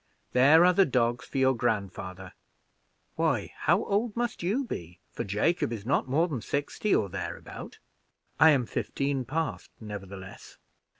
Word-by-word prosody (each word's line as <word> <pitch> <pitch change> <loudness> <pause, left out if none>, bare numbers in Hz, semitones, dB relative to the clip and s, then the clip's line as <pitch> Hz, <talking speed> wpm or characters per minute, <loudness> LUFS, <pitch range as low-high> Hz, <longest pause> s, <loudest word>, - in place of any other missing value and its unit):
There 145 +7 +7
are 180 - +5
the 190 +1 +4
dogs 120 -2 0
for - - -5
your 130 0 +4
grandfather. 95 -4 -3 0.8
Why, - - 0
how - - +2
old 210 +2 0
must 240 0 -2
you 205 +11 0
be, 85 - -7
for - - -4
Jacob 115 - 0
is 110 -3 -5
not 130 - +1
more 160 +6 +3
than 135 -9 -4
sixty 145 - -1
or 105 - +1
thereabout?" 85 -3 -7 0.6
"I 160 - +8
am 135 -5 +3
fifteen, 140 +2 -2
past, 155 +5 -3
nevertheless." 100 -3 -9
130 Hz, 145 wpm, -28 LUFS, 100-165 Hz, 0.8 s, I